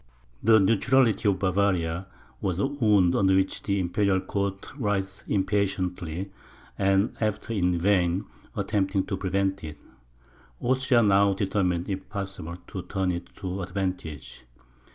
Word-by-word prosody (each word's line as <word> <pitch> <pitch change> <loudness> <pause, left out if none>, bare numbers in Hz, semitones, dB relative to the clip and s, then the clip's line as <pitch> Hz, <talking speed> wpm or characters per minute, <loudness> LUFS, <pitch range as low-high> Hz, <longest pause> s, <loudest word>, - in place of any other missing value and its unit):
The 110 0 +6
neutrality 115 +1 +3
of 95 - +1
Bavaria, 95 -2 0 0.3
was 90 -3 -1
a 100 - +1
wound 105 -10 +3
under 95 -1 +4
which 95 0 +1
the 100 -1 0
Imperial 95 +2 +1
court 100 +3 -3
writhed 95 -4 -2
impatiently; 95 -3 -1 0.4
and 95 +1 +2
after 110 +1 -1
in 90 -4 +1
vain 90 +1 +2 0.3
attempting 95 -1 0
to 100 - -2
prevent 95 0 -1
it, 75 -1 -7 0.8
Austria 130 -1 +3
now 100 -1 +4
determined, 95 -3 0
if 95 -2 -4
possible, 95 -4 -5
to 95 - -6
turn 95 0 -1
it 85 0 -5
to 95 +1 -4
advantage. 90 -7 -5
95 Hz, 130 wpm, -26 LUFS, 90-100 Hz, 0.8 s, The